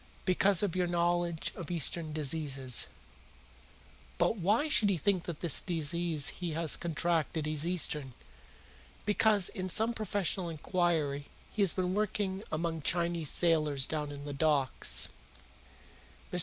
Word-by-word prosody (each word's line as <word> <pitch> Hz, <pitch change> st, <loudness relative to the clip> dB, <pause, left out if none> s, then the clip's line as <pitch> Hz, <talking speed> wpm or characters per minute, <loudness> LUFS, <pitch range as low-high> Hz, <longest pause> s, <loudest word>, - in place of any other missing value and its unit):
"Because 190 Hz, +1 st, +3 dB
of 195 Hz, -4 st, -1 dB
your 180 Hz, -1 st, +1 dB
knowledge 175 Hz, -1 st, 0 dB
of 170 Hz, -, -7 dB
Eastern 165 Hz, -1 st, +2 dB
diseases." 140 Hz, -4 st, -2 dB, 1.3 s
"But -, -, +2 dB
why 210 Hz, -, +1 dB
should 230 Hz, -8 st, +3 dB
he 190 Hz, -, +1 dB
think 185 Hz, +2 st, 0 dB
that 170 Hz, -3 st, -6 dB
this 170 Hz, -5 st, +3 dB
disease 170 Hz, -2 st, +1 dB
which -, -, -14 dB
he 175 Hz, -2 st, -3 dB
has 160 Hz, 0 st, +2 dB
contracted 165 Hz, -1 st, -1 dB
is 155 Hz, +1 st, -1 dB
Eastern?" 150 Hz, -7 st, 0 dB, 0.9 s
"Because, 210 Hz, -2 st, +3 dB
in 185 Hz, 0 st, -5 dB
some 220 Hz, +6 st, +3 dB
professional 200 Hz, -4 st, -2 dB
inquiry, 160 Hz, -3 st, -1 dB, 0.3 s
he 215 Hz, -, -1 dB
has 195 Hz, -5 st, +4 dB
been 185 Hz, -1 st, -1 dB
working 200 Hz, -1 st, -1 dB
among 165 Hz, 0 st, -2 dB
Chinese 170 Hz, -1 st, +1 dB
sailors 155 Hz, -5 st, +3 dB
down 150 Hz, -1 st, -3 dB
in 145 Hz, 0 st, -8 dB
the 145 Hz, -, -5 dB
docks." 140 Hz, -3 st, +1 dB
170 Hz, 135 wpm, -31 LUFS, 155-185 Hz, 1.3 s, has